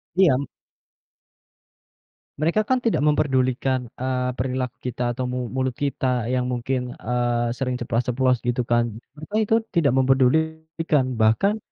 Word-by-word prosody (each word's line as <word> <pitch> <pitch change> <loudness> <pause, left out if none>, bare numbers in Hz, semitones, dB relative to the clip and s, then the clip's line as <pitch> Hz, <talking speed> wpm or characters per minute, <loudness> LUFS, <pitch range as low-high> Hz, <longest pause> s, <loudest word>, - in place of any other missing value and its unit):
Iya. 140 -8 +3 1.9
Mereka 165 +7 +2
kan 260 - +4
tidak 225 - +2
memperdulikan, 130 -4 +1
eee, 130 0 -1
perilaku 125 -1 -2
kita 120 -1 -1
atau 130 0 -2
mu 125 -1 -3
mulut 130 -1 -1
kita 125 -3 -1
yang 125 0 0
mungkin, 125 0 -2
eee, 120 0 -1
sering 125 -2 -1
ceplas-ceplos 125 +2 +1
gitu 120 0 +1
kan. 120 -1 +1 0.2
Mereka 155 +8 -7
itu 220 +1 +2 0.2
tidak 150 -7 +3
memperdulikan, 160 +3 +2
bahkan 115 - +3
130 Hz, 125 wpm, -23 LUFS, 125-145 Hz, 1.9 s, kan